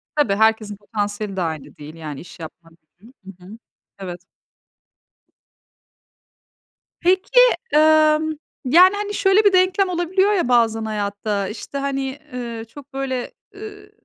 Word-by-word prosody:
Tabii, 260 Hz, -10 st, +2 dB
herkesin 220 Hz, -1 st, +1 dB
potansiyeli 205 Hz, -1 st, -4 dB
de 190 Hz, -, -2 dB
aynı 160 Hz, -4 st, -5 dB
değil. 150 Hz, +2 st, -11 dB
Yani, 150 Hz, -4 st, -7 dB
iş 175 Hz, -, -14 dB
yapma. 165 Hz, +1 st, -11 dB, 0.3 s
Hı -, -, -19 dB
hı, 235 Hz, -, -15 dB, 0.3 s
hı 180 Hz, -, -15 dB
hı. 215 Hz, +4 st, -11 dB, 0.4 s
Evet. 180 Hz, -2 st, -7 dB, 2.8 s
Peki, 375 Hz, +7 st, +3 dB, 0.3 s
emm, 310 Hz, 0 st, +4 dB, 0.3 s
yani, 360 Hz, +9 st, +6 dB
hani, 410 Hz, 0 st, -4 dB
şöyle 390 Hz, +1 st, +3 dB
bir 400 Hz, -, +5 dB
denklem 370 Hz, +1 st, +3 dB
olabiliyor 365 Hz, +3 st, +1 dB
ya 360 Hz, -10 st, 0 dB
bazen 225 Hz, -2 st, +2 dB
hayatta, 205 Hz, -1 st, -3 dB
işte, 225 Hz, +7 st, -7 dB
hani, 275 Hz, 0 st, -3 dB
ııı, 235 Hz, -2 st, -6 dB
çok, 275 Hz, +4 st, -15 dB
böyle, 260 Hz, -2 st, -3 dB, 0.2 s
ııı, 415 Hz, 0 st, -11 dB
250 Hz, 130 wpm, -21 LUFS, -, 2.8 s, yani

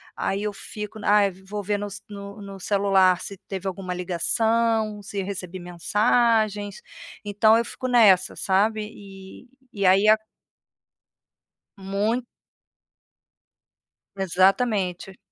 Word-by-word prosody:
aí 195 Hz, +1 st, -2 dB
eu 210 Hz, -, -1 dB
fico 210 Hz, +2 st, -8 dB
n -, -, -6 dB
ai 205 Hz, -1 st, +4 dB
vou 190 Hz, +3 st, -7 dB
ver 205 Hz, +1 st, -1 dB
no 205 Hz, -, -4 dB
s 200 Hz, -, -9 dB
no 200 Hz, 0 st, -9 dB
no 195 Hz, -1 st, -9 dB
celular 190 Hz, -2 st, +3 dB
se 200 Hz, -, -7 dB
teve 195 Hz, -1 st, -5 dB
alguma 185 Hz, -1 st, -4 dB
ligação, 215 Hz, +4 st, 0 dB
se 200 Hz, 0 st, -4 dB
recebi 185 Hz, -2 st, -6 dB
mensagens, 210 Hz, +3 st, +1 dB, 0.4 s
então 210 Hz, +2 st, +4 dB
eu 235 Hz, -, +1 dB
fico 255 Hz, -, -5 dB
nessa 215 Hz, -7 st, +4 dB
sabe 215 Hz, +3 st, +1 dB
e 195 Hz, +1 st, -12 dB, 0.3 s
e 200 Hz, -1 st, -1 dB
aí 195 Hz, +3 st, +5 dB
a 215 Hz, -, +8 dB, 1.6 s
Muito. 205 Hz, +5 st, -1 dB, 1.9 s
Exatamente. 190 Hz, 0 st, +1 dB
200 Hz, 120 wpm, -24 LUFS, 190-215 Hz, 1.9 s, a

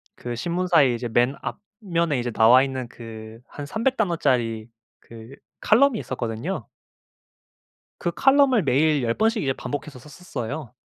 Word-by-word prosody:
그 120 Hz, -1 st, -6 dB
신문사의 170 Hz, -3 st, +2 dB
이제 120 Hz, 0 st, -5 dB
맨 120 Hz, +4 st, +2 dB, 0.5 s
앞면에 170 Hz, -6 st, 0 dB
이제 120 Hz, 0 st, -3 dB
나와 115 Hz, +4 st, +6 dB
있는 130 Hz, -2 st, -4 dB
그 110 Hz, -1 st, -10 dB
한 145 Hz, -, -8 dB
300 230 Hz, -, -1 dB
단어짜리 125 Hz, -, 0 dB, 0.3 s
그 115 Hz, +3 st, -13 dB, 0.2 s
칼럼이 235 Hz, +1 st, +3 dB
있었거든요. 115 Hz, -3 st, -4 dB, 1.4 s
그 175 Hz, -, -1 dB
칼럼을 270 Hz, -5 st, +4 dB
매일 145 Hz, +1 st, +2 dB
10 115 Hz, -1 st, 0 dB
번씩 225 Hz, -, +1 dB
이제 135 Hz, -, 0 dB
반복해서 145 Hz, 0 st, -6 dB
썼었어요. 145 Hz, -, -7 dB
135 Hz, 275 characters per minute, -23 LUFS, 120-175 Hz, 1.4 s, 나와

